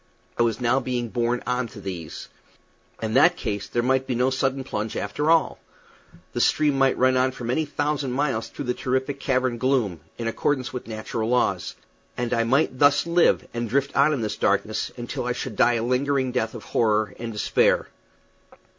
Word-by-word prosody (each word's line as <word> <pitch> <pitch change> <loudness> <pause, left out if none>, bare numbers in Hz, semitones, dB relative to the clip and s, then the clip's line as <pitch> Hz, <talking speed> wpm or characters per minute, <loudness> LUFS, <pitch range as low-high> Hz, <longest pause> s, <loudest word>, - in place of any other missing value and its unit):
I - - -1
was 115 0 +1
now 125 +2 +2
being 125 -3 -3
borne 120 +1 -1
on 125 0 -1
to 110 - -12
these. 90 -5 -7 0.8
In 110 0 -2
that 170 +7 +5
case 100 -1 -3
there 120 - -1
might 130 +1 +1
be 125 - -1
no 125 +2 +2
sudden 135 0 0
plunge, 110 -4 -4
after 145 +10 -2
all. 165 0 +3 0.7
The 120 - 0
stream 150 +1 +3
might 135 -1 +3
run 130 0 +3
on 130 +1 +2
for 125 - -9
many 125 +7 0
thousand 145 -2 -2
miles 135 -4 -1
through 145 - -7
this 125 0 -2
terrific 130 +2 -1
cavern 130 -3 0
gloom, 125 -10 +1 0.2
in 115 - -3
accordance 130 +1 -1
with 125 - -6
natural 110 0 -3
laws; 125 0 0 0.4
and 120 0 -1
I 115 -1 +2
might 130 +1 +1
thus 145 0 +5
live, 170 0 +3
and 120 -1 -3
drift 140 +3 0
on 140 +2 +5
in 140 -5 -1
this 105 -1 -3
darkness, 105 +2 0
until 120 0 -4
I 125 - 0
should 120 -2 -5
die 120 - +4
a 115 - -1
lingering 130 +1 +1
death 120 -2 -1
of 110 - -8
horror 110 -1 +1
and 115 0 -4
despair. 105 - +2
125 Hz, 190 wpm, -24 LUFS, 115-135 Hz, 0.8 s, that